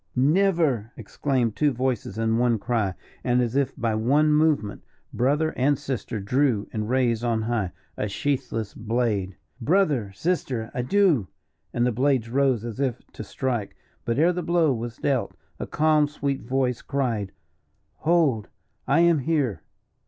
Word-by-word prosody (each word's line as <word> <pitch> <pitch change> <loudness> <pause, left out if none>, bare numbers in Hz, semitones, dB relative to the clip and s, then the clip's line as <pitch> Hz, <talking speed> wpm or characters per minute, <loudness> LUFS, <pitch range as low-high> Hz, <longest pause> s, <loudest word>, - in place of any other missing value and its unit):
"Never!" 150 - +2
exclaimed 120 0 -1
two 150 +3 +2
voices 125 -5 -2
in 115 0 +1
one 120 -2 +3
cry, 110 -4 -1 0.3
and, 125 -1 +2
as 120 0 0
if 140 -2 +2
by 115 -1 0
one 140 +8 +3
movement, 150 -9 +1 0.3
brother 145 +6 +1
and 140 +2 +2
sister 130 -5 -4
drew, 120 +1 +1
and 105 0 -3
raised 120 -3 +1
on 115 -2 0
high, 110 -5 -1 0.3
a 105 - -1
sheathless 115 -1 -2
blade. 110 -5 -1 0.2
"Brother 145 - +2
sister 125 - -2
adieu!" 145 - +2 0.4
and 120 - +1
the 125 - +2
blades 125 -1 +1
rose 130 -4 +2
as 120 +1 -6
if 130 -3 0
to - - -7
strike 120 -7 -3 0.3
but 115 +1 -1
ere 170 +4 +4
the 180 - -2
blow 170 -4 +2
was 120 0 -5
dealt, 135 -4 -1 0.2
a - - -4
calm, 155 -1 +3
sweet 140 -2 -3
voice 125 0 -1
cried 115 -8 -2 0.7
"Hold! 155 -10 +2 0.4
I 145 +5 +4
am 170 -2 +4
here." 140 -6 0
125 Hz, 150 wpm, -25 LUFS, 115-145 Hz, 0.7 s, ere